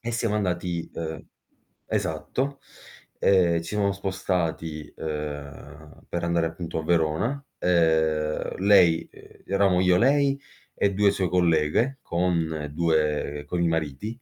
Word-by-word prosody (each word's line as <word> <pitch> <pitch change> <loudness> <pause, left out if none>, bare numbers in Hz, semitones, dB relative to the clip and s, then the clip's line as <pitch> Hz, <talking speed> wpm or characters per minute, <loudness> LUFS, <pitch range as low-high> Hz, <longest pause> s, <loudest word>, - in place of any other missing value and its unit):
e 120 - -3
siamo 115 -2 0
andati, 90 -4 -2
uhm 80 -1 -5 0.6
esatto, 140 +2 -2 0.6
ehm, 90 -3 +4
ci - - -4
siamo 100 -1 +2
spostati, 90 -5 -3
ehm, 75 -1 -7
per 85 0 -2
andare 85 -1 +1
appunto 80 0 -5
a - - -8
Verona, 85 - +1 0.2
ehm, 80 -3 +1
lei 90 -4 +4
uhm, - - -15 0.2
eravamo 95 -2 +2
io 90 -1 +4
lei 140 +4 +3 0.4
e 100 - +1
2 100 +1 +4
sue 95 -3 -1
colleghe 90 - +2
con 85 -3 -1
2 75 -3 0
con 85 -1 -1
i - - +3
mariti. 80 - -3
85 Hz, 125 wpm, -25 LUFS, 80-100 Hz, 0.6 s, ehm